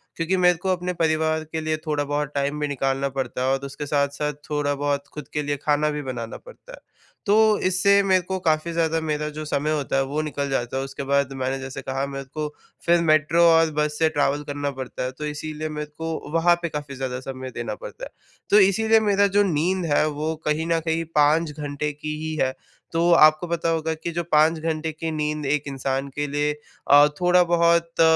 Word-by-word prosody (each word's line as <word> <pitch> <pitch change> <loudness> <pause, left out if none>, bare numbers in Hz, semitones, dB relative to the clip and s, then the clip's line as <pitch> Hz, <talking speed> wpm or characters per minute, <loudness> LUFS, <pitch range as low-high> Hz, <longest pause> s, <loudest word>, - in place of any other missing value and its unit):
क्योंकि 175 +3 0
मेरे 180 -1 +4
को 190 +3 -3
अपने 180 0 -4
परिवार 160 0 +1
के 160 0 -2
लिए 155 0 -1
थोड़ा-बहुत 145 -1 -1
टाइम 140 +1 -1
भी 150 - 0
निकालना 135 0 -1
पड़ता 130 -1 -3
है - - +1
और 135 +1 -2
उसके 140 +2 -6
साथ-साथ 145 +1 0 0.2
थोड़ा 145 -1 0
बहुत 145 0 -1
ख़ुद 150 -2 -7
के 150 - 0
लिए 145 0 -2
खाना 150 0 +2
भी 150 0 -3
बनाना 125 -4 -5
पड़ता - - -15
है। - - -11 0.5
तो 205 -1 +3 0.3
इससे 200 +2 +4
मेरे 190 -1 +3
को 190 +2 -4
काफ़ी 160 -1 0
ज़्यादा 165 -1 +1
मेरा 150 -1 -2
जो 155 - -4
समय 150 0 -1
होता 145 -3 -1
है, 135 - +3
वो 145 +3 -2
निकल 145 -2 -3
जाता 125 -1 -2
है, 135 - -1
उसके 135 +1 -6
बाद 140 0 +1
मैंने 135 0 -2
जैसे 135 0 -6
कहा 135 +1 -2
मेरे 135 0 -6
को 155 -1 -2 0.4
फिर 170 0 +4
मेट्रो 155 +1 +3
और 165 -1 +4
बस 150 0 0
से 160 - +4
ट्रैवल 145 -1 0
करना 145 0 -3
पड़ता 130 -2 -6
है, 130 - -2
तो 150 +4 -7
इसीलिए 155 +1 -4
मेरे 150 -1 -6
को 160 -2 -5
वहाँ 170 +1 +4
पे 170 - -2
काफ़ी 145 -2 -6
ज़्यादा 130 -1 -4
समय 130 0 -7
देना - - -4
पड़ता - - -9
है। - - -10 0.4
तो 210 - +7
इसीलिए 220 +3 +4
मेरा 200 -1 +3
जो 205 - +6
नींद 180 +1 0
है, 155 - +3
वो 155 +2 -3
कहीं 155 +2 0
न 165 -1 +2
कहीं 165 0 0
5 150 +2 +3
घंटे 145 0 -4
की 150 +1 -5
ही 155 0 -3
है, 130 - -2 0.4
तो 170 +1 +2
आपको 155 +1 +6
पता 170 0 -1
होगा 160 -1 0
कि 165 +2 -5
जो 170 +1 -2
5 160 0 +3
घंटे 160 0 -2
की 160 +1 -5
नींद 150 -1 -2
एक 145 +1 +1
इंसान 135 0 -2
के 145 0 -1
लिए 145 +1 0 0.4
अ, 145 +1 +8
थोड़ा-बहुत 170 -2 +3
150 Hz, 215 wpm, -23 LUFS, 145-165 Hz, 0.5 s, अ